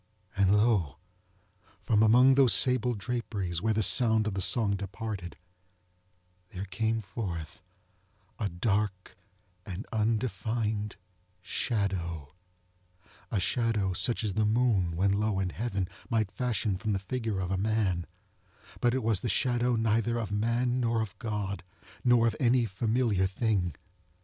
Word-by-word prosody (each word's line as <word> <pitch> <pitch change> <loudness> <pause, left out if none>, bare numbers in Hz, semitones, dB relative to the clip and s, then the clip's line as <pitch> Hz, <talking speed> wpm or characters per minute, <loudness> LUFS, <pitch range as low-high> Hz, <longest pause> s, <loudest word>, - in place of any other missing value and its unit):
And 100 +1 +4
lo! 105 - +2 0.8
from 110 -1 +1
among 125 +4 +6
those 130 -6 +5
sable 125 0 +4
draperies 100 -6 -3
where 110 +1 +1
the 110 - +1
sounds 110 -2 +3
of 105 - -2
the 95 - -2
song 100 +1 +2
departed, 100 -1 -6 1.1
there 95 +1 -6
came 110 +4 -1
forth 90 -5 -6 0.8
a 105 - -1
dark 95 +1 -2 0.5
and 95 +3 -7
undefined 110 -1 -1 0.5
shadowŌĆöa 90 - -2 1.1
shadow 105 0 0
such 115 +5 +1
as 105 -3 -1
the 110 - +1
moon, 105 -6 +2
when 95 +3 +2
low 105 -1 0
in 95 -1 -1
heaven, 100 -3 -2 0.2
might 110 -4 0
fashion 110 -5 -1
from 110 0 -1
the - - +1
figure 110 +1 -3
of 90 0 -3
a - - +1
man: 100 -4 0 0.7
but 120 +1 +2
it 130 - -1
was 110 -4 +1
the 120 - -3
shadow 120 -1 +1
neither 115 +1 +1
of 110 -4 -3
man 120 +4 0
nor 115 -2 +1
of 110 -1 -5
God, 105 -5 -3 0.4
nor 120 -2 +4
of 115 -2 +1
any 125 -1 +3
familiar 110 -1 +1
thing. 95 - -1
110 Hz, 135 wpm, -29 LUFS, 95-115 Hz, 1.1 s, among